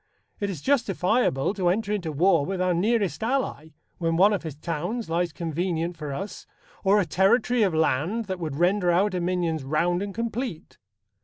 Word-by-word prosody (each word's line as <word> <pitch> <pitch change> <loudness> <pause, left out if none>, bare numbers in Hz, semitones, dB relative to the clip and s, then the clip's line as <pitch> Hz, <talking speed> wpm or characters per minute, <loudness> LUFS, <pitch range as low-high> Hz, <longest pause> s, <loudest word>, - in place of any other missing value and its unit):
It 200 - -1
is 170 -7 -6
justifiable 210 - +1
to 190 -4 -1
enter 205 +3 +1
into 175 -6 -2
war 165 +1 +3
with 190 +5 -3
our 185 -1 +2
nearest 205 +3 0
ally, 230 - -1 0.3
when 165 -1 0
one 200 +4 +5
of 200 - -1
his 160 -4 -6
towns 170 +7 -4
lies 170 0 0
convenient 170 +1 -2
for 150 -3 -6
us, 190 +7 -6 0.4
or 200 +1 +4
a 195 - +1
territory 230 +7 +2
of 190 -6 +2
land 160 - +1
that 190 -2 -4
would 155 -5 -4
render 180 +3 +2
our 195 +4 +2
dominions 175 -4 -1
round 170 +6 0
and 200 0 -3
complete. 230 -3 -4
180 Hz, 175 wpm, -25 LUFS, 165-205 Hz, 0.4 s, one